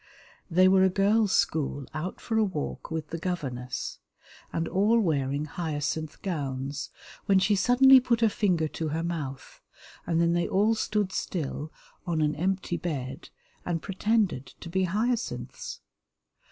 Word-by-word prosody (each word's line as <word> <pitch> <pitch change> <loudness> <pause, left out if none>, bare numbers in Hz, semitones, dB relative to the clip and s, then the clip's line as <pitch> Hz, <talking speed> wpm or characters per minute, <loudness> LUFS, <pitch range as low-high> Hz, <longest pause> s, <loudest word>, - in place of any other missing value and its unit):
They 185 +2 +5
were 190 0 +5
a 190 - +5
girls' 200 +2 +3
school 140 -3 0
out 160 +4 -4
for 225 - -3
a 220 - +4
walk 185 -8 -4
with 160 -2 -4
the 165 - -3
governess, 135 -9 -4 0.5
and 165 0 -1
all 210 +5 +3
wearing 145 -6 0
hyacinth 155 -1 -3
gowns, 140 -5 -3 0.4
when 195 - +5
she 195 +2 +3
suddenly 260 +6 +7
put 235 -2 +1
her 225 - +6
finger 180 -6 +1
to 160 - -3
her 160 +2 -2
mouth, 150 -6 -5 0.5
and 165 -1 +1
then 170 0 +3
they 175 0 +1
all 210 +4 +3
stood 210 -3 0
still 155 -4 -3 0.4
on 165 -2 0
an 150 -1 +2
empty 180 +2 -1
bed 140 -3 -5 0.3
and 170 -2 -2
pretended 200 - 0
to 170 - -7
be 190 +2 +1
hyacinths. 220 +6 -2
175 Hz, 150 wpm, -28 LUFS, 155-200 Hz, 0.5 s, suddenly